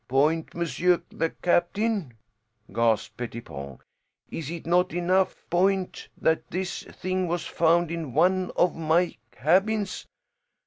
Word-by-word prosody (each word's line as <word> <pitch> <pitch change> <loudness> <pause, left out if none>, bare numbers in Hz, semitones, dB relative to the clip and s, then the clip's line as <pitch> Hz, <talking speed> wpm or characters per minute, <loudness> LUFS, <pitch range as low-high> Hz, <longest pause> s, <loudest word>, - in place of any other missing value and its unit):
"Point, 150 +5 +1
monsieur 170 +2 +1
the 165 - 0
captain?" 180 - 0 0.6
gasped 115 -2 +1
Pettipon. 70 - -7 0.5
"Is 155 -3 -5
it 170 -1 -6
not 175 +1 +2
enough 185 +2 +1
point 190 +1 +1
that 160 0 +1
this 185 0 -3
thing 185 0 -2
was 170 0 -2
found 170 0 +2
in 160 -7 -4
one 185 0 +3
of 175 - +3
my 165 +2 +2 0.2
cabins? 195 - +1
175 Hz, 120 wpm, -26 LUFS, 160-185 Hz, 0.6 s, one